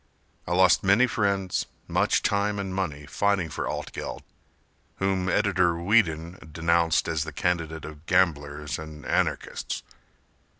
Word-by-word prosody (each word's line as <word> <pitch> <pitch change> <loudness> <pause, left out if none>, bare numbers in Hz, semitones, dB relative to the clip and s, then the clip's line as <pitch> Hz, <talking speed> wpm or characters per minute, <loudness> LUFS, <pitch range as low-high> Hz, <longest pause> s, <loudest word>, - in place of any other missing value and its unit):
I 90 - -1
lost 95 0 +5
many 100 +6 +5
friends, 100 -6 0 0.2
much - - +2
time 100 0 +1
and 95 -2 -3
money 80 -7 -3
Fighting 100 +2 0
for - - -3
Altgeld - - -5 0.7
whom 95 -1 0
Editor 95 -4 +2
Whedon 85 -3 +1
Denounced 85 +1 +2
as 80 -2 0
the 80 - -6
candidate 80 0 -2
of 75 +1 -11
gamblers 75 -5 +1
and 75 -3 -9
anarchists. - - -1
90 Hz, 125 wpm, -26 LUFS, 80-95 Hz, 0.7 s, lost